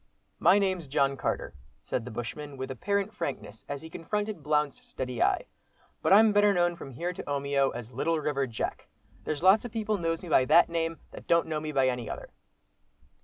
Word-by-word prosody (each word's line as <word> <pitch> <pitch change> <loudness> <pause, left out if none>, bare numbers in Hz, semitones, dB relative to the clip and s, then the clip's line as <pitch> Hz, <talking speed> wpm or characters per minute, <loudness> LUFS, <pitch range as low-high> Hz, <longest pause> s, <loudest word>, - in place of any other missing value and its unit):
"My 180 +4 +6
name's 185 -5 0
John 140 -1 +2
Carter," - - -2 0.3
said 120 - -3
the - - -6
bushman, 135 +5 -6
with 130 0 -4
apparent 200 +9 -1
frankness, 135 -9 -5
as 145 +1 -5
he 160 - -8
confronted 210 +2 -3
Blount's 150 -1 0
steady 125 -2 -5
eye, - - +2 0.6
"but - - +1
I'm 215 +2 +7
better 205 -1 +4
known 175 0 +2
from 140 - -9
here 175 +8 -3
to - - -6
Omeo, 140 -1 +1
as 120 -1 -7
'Little 165 +1 0
River 140 -2 -1
Jack'; 115 -3 -4 0.4
there's 155 +1 -3
lots 190 +3 +6
of 245 - -6
people 215 -2 -1
knows 165 0 -1
me 175 - -7
by 130 -4 +5
that 170 +7 +6
name, 165 -1 -1
that - - -11
don't 170 0 +4
know 155 -1 -2
me 155 0 -4
by 135 -3 +3
any 125 -3 -2
other." - - -7
155 Hz, 200 wpm, -28 LUFS, 135-180 Hz, 0.6 s, I'm